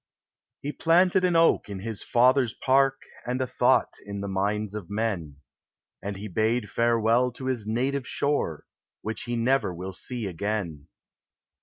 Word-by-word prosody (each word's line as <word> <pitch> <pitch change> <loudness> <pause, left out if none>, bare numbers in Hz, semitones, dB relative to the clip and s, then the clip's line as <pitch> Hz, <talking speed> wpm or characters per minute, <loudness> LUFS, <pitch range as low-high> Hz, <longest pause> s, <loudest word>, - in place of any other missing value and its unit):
He 145 - -3
planted 180 +4 +3
an 180 -2 +2
oak 165 -9 +4
in 100 - -5
his 110 0 -5
father's 125 0 +3
park 135 0 +2 0.2
And 125 +1 -2
a 130 - +1
thought 130 - +2
in 100 0 -6
the 100 - -3
minds 100 +2 -1
of 105 -5 -6
men, 100 -9 -2 0.7
And 100 +1 -4
he 105 +2 -6
bade 110 +2 0
farewell 115 +2 +2
to 130 - -8
his 125 -5 -2
native 130 +4 -1
shore, 140 - -1 0.4
Which 110 +1 -4
he 120 0 -2
never 120 -2 +2
will 90 +2 -6
see 120 +4 -5
again. 90 -5 -3
115 Hz, 155 wpm, -26 LUFS, 100-130 Hz, 0.7 s, oak